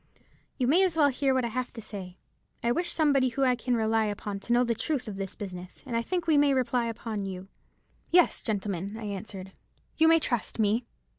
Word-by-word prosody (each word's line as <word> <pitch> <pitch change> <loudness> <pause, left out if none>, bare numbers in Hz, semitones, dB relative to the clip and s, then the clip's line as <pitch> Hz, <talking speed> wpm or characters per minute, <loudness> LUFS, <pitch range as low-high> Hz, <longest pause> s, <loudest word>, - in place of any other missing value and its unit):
'You 255 - +1
may 315 +9 +4
as 355 -4 +1
well 290 -2 +5
hear 270 +1 +1
what 260 -2 +2
I - - -2
have 250 +2 -3
to 235 - -8
say. 190 -4 -8 0.5
I 235 - +2
wish 345 +7 0
somebody 280 -5 +3
whom 270 +3 0
I 250 -1 +4
can 245 0 -1
rely 220 -1 +2
upon 205 -1 -4
to 220 - -6
know 240 +1 +5
the 235 -1 +1
truth 250 +3 -2
of 210 - -5
this 195 -1 -5
business, 185 -3 -8
and 235 - -4
I 230 - +2
think 350 +7 -2
we 310 -3 +4
may 285 -1 +4
rely 250 -2 +1
upon 220 -3 -4
you.' 190 0 -7 0.6
"'Yes, 355 0 +4
gentlemen,' 200 -2 -3
I 225 - -7
answered, 195 -2 -6 0.5
'you 320 - +5
may 330 0 +7
trust 245 -7 -1
me.' 220 +2 +1
235 Hz, 220 wpm, -28 LUFS, 205-270 Hz, 0.6 s, may